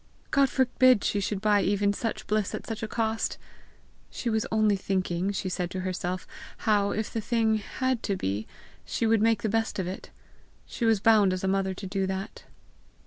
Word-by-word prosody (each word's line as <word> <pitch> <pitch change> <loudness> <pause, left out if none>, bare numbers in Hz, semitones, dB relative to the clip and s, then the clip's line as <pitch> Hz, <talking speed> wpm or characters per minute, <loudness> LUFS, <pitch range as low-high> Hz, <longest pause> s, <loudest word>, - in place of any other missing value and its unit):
God 275 -1 +4
forbid 255 -3 +4
she 205 - +1
should 200 0 -2
buy 210 -1 +3
even 200 +1 +2
such 225 +2 -3
bliss 210 -2 0
at - - -7
such 225 -2 -5
a 220 - -2
cost! 225 0 -1 0.7
She 235 - -3
was 220 0 0
only 215 -2 +3
thinking, 185 -1 -1
she 195 - -3
said 180 -1 -2
to 185 0 -4
herself, 185 0 -3 0.4
how, 205 -2 +3
if 220 +1 -3
the 225 - -1
thing 220 0 +1
had 260 +3 -2
to 200 - -1
be, 100 - -3 0.4
she - - -2
would 225 -1 +3
make 225 -2 +2
the - - +1
best 225 +1 0
of 190 - -1
it: 185 +2 -6 0.6
she 235 - -3
was 225 -2 +4
bound 210 -3 +5
as 185 - -4
a - - +1
mother 190 0 0
to 195 - -7
do 190 0 -1
that! 190 +1 -5
205 Hz, 195 wpm, -27 LUFS, 190-225 Hz, 0.7 s, bound